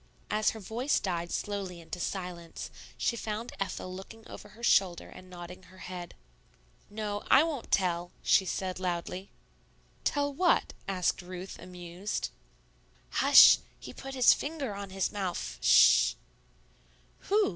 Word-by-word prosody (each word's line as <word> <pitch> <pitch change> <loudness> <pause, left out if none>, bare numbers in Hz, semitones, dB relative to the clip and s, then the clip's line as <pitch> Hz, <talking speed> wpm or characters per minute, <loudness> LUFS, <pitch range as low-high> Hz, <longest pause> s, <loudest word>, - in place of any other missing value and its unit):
As 215 0 +2
her 220 - -5
voice 235 +7 0
died 175 -3 -3
slowly 195 -4 -3
into 170 +2 -8
silence, 175 -2 -5 0.3
she 235 - 0
found 220 +1 -4
Ethel 185 -1 -4
looking 220 +4 -10
over 210 - -10
her 225 +3 -16
shoulder 190 -6 +3
and 185 - -13
nodding 180 0 -9
her 185 - -17
head. 180 -2 -8 0.7
"No; 205 -1 -4
I 270 - +7
won't 310 -7 -4
tell," 175 -2 +1
she - - +5
said 185 0 -3
loudly. 180 +1 -3 0.7
"Tell 285 -1 0
what?" 350 +5 +2
asked 185 -1 0
Ruth, 185 +1 -8
amused. 180 +2 -5 0.8
"Hush! - - +8 0.2
He - - -9
put 270 0 -8
his 255 -2 +7
finger 285 -7 -4
on 200 0 -6
his 190 -1 -1
mouf 190 -4 -4
sh!" - - +6 1.1
"Who?" 420 +2 +4
195 Hz, 135 wpm, -30 LUFS, 180-220 Hz, 1.1 s, Hush